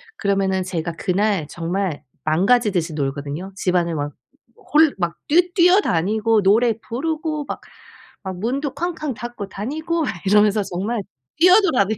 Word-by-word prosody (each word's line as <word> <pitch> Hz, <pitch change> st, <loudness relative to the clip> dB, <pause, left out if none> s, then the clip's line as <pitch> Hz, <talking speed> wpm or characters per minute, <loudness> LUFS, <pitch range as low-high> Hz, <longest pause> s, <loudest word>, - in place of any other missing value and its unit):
그러면은 195 Hz, -, 0 dB
제가 170 Hz, -2 st, -3 dB
그날 190 Hz, 0 st, 0 dB
정말 175 Hz, -1 st, -2 dB, 0.2 s
망가지듯이 185 Hz, 0 st, +2 dB
놀거든요. 145 Hz, +5 st, -4 dB
집안을 175 Hz, -3 st, 0 dB
막 145 Hz, -1 st, -3 dB, 0.6 s
홀 310 Hz, -1 st, +5 dB
막 170 Hz, -1 st, -1 dB
뛰 350 Hz, +4 st, +3 dB
뛰어다니고 225 Hz, -, +3 dB
노래 225 Hz, +4 st, +4 dB
부르고 305 Hz, +5 st, -3 dB
막 -, -, -5 dB, 0.6 s
막 190 Hz, -1 st, -5 dB
문도 265 Hz, +7 st, -2 dB
쾅쾅 315 Hz, -3 st, -3 dB
닫고 240 Hz, -3 st, -6 dB
다니고 315 Hz, -, -3 dB
막 285 Hz, -, -1 dB, 0.2 s
이러면서 210 Hz, +1 st, +4 dB
정말 200 Hz, +5 st, -3 dB, 0.4 s
뛰어도 365 Hz, +4 st, +6 dB
다녀요. 220 Hz, -3 st, +1 dB
210 Hz, 300 characters per minute, -21 LUFS, 180-285 Hz, 0.6 s, 뛰어도